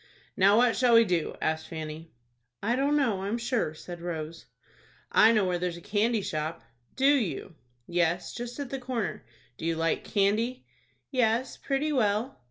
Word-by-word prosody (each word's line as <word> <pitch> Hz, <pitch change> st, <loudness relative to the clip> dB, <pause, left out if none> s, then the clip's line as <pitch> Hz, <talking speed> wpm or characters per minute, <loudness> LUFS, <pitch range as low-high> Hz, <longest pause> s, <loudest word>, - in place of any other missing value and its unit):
"Now, 200 Hz, +2 st, +5 dB
what 240 Hz, -1 st, +4 dB
shall 245 Hz, -2 st, +4 dB
we 230 Hz, 0 st, +7 dB
do?" 175 Hz, -5 st, -1 dB
asked 160 Hz, 0 st, -1 dB
Fanny. 160 Hz, 0 st, -7 dB, 0.5 s
"I 230 Hz, +4 st, +2 dB
don't 280 Hz, +3 st, +2 dB
know, 230 Hz, -10 st, +1 dB
I'm 200 Hz, +4 st, -1 dB
sure," 235 Hz, -9 st, -1 dB
said 175 Hz, +2 st, -9 dB
Rose. 165 Hz, -2 st, -5 dB, 0.6 s
"I 220 Hz, -, +7 dB
know 215 Hz, -4 st, +3 dB
where 180 Hz, -1 st, 0 dB
there's 175 Hz, -1 st, -2 dB
a -, -, -8 dB
candy 215 Hz, +4 st, 0 dB
shop." 160 Hz, -3 st, -3 dB, 0.3 s
"Do 265 Hz, -, 0 dB
you?" 255 Hz, -, +2 dB, 0.3 s
"Yes, 175 Hz, 0 st, 0 dB
just 240 Hz, +3 st, -6 dB
at 280 Hz, -3 st, -5 dB
the 270 Hz, -, -3 dB
corner. 245 Hz, -3 st, -3 dB, 0.3 s
Do -, -, -6 dB
you 165 Hz, -, +1 dB
like 165 Hz, 0 st, 0 dB
candy?" 215 Hz, +5 st, 0 dB, 0.5 s
"Yes, 245 Hz, -1 st, +1 dB
pretty 295 Hz, +2 st, -1 dB
well." 225 Hz, 0 st, 0 dB
210 Hz, 170 wpm, -28 LUFS, 170-245 Hz, 0.6 s, we